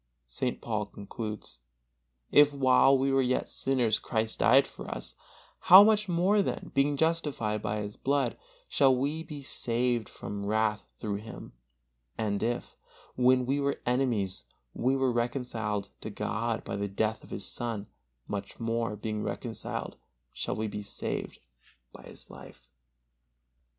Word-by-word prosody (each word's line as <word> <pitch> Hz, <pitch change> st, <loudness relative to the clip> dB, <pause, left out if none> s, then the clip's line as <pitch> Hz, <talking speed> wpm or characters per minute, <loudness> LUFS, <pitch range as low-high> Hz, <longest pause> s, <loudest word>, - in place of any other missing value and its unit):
St. 65 Hz, -, -3 dB
Paul 105 Hz, -3 st, -2 dB
concludes: 105 Hz, -, -7 dB, 0.7 s
"If 145 Hz, 0 st, +6 dB
while 135 Hz, 0 st, +5 dB
we 135 Hz, +1 st, +1 dB
were 135 Hz, 0 st, +4 dB
yet 130 Hz, 0 st, 0 dB
sinners 125 Hz, -5 st, +1 dB
Christ 110 Hz, -1 st, -2 dB
died 135 Hz, +4 st, +6 dB
for -, -, -9 dB
us, -, -, -4 dB, 0.6 s
how 190 Hz, +3 st, +12 dB
much 210 Hz, -2 st, +3 dB
more 185 Hz, +4 st, +3 dB
then, -, -, -3 dB
being 140 Hz, +1 st, +2 dB
justified 150 Hz, -10 st, 0 dB
by 105 Hz, 0 st, -2 dB
His 105 Hz, 0 st, -6 dB
blood, 140 Hz, 0 st, +1 dB, 0.3 s
shall 135 Hz, -2 st, +4 dB
we 145 Hz, +5 st, -1 dB
be 150 Hz, -3 st, -8 dB
saved 120 Hz, -3 st, 0 dB
from 100 Hz, 0 st, -6 dB
wrath 110 Hz, 0 st, +1 dB, 0.2 s
through 100 Hz, -2 st, -2 dB
Him; 110 Hz, +2 st, -10 dB, 0.6 s
and 105 Hz, -3 st, -1 dB
if, 120 Hz, +2 st, -2 dB, 0.4 s
when 125 Hz, 0 st, +4 dB
we 135 Hz, +3 st, 0 dB
were 140 Hz, 0 st, 0 dB
enemies, 120 Hz, -7 st, 0 dB, 0.3 s
we 130 Hz, +2 st, +1 dB
were 135 Hz, -1 st, +2 dB
reconciled 120 Hz, -4 st, -2 dB
to -, -, -5 dB
God 115 Hz, 0 st, -2 dB
by -, -, -4 dB
the 100 Hz, 0 st, -1 dB
death 110 Hz, +3 st, -1 dB
of -, -, -14 dB
His -, -, -4 dB
Son, 115 Hz, -4 st, -3 dB, 0.4 s
much 100 Hz, -1 st, -5 dB
more, 115 Hz, -2 st, -1 dB
being 105 Hz, 0 st, -3 dB
reconciled, -, -, -4 dB, 0.4 s
shall -, -, -3 dB
we 110 Hz, -, -2 dB
be 105 Hz, 0 st, -5 dB
saved 100 Hz, -, -4 dB, 0.5 s
by -, -, -12 dB
His -, -, -12 dB
life." -, -, -13 dB
120 Hz, 145 wpm, -29 LUFS, 105-135 Hz, 0.7 s, how